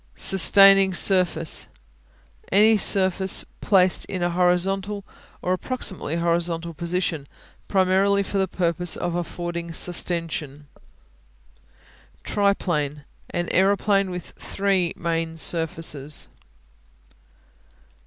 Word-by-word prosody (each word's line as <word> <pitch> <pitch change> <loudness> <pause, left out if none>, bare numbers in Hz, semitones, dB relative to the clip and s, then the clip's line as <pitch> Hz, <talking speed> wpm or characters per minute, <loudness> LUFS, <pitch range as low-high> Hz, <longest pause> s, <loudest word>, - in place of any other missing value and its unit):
Sustaining 195 0 +5
Surface 175 -4 +2 0.8
Any 215 +3 +5
surface 190 -2 +2 0.2
placed 185 -3 +2
in 185 -2 -4
a 175 - 0
horizontal 190 +3 0 0.4
or 180 - 0
approximately 190 - -3
horizontal 170 0 -1
position, 170 -3 -3 0.4
primarily 195 +1 +2
for 195 0 -3
the 190 - +1
purpose 175 -1 -2
of 175 - -3
affording 175 0 -5
sustension. 165 -4 -2 1.6
Triplane 160 -8 -1 0.3
An 175 0 -3
aeroplane 195 0 +2
with 180 -1 -7
three 195 -3 -1
main 165 -1 -3
surfaces. 160 -3 -2
180 Hz, 85 wpm, -23 LUFS, 170-195 Hz, 1.6 s, Sustaining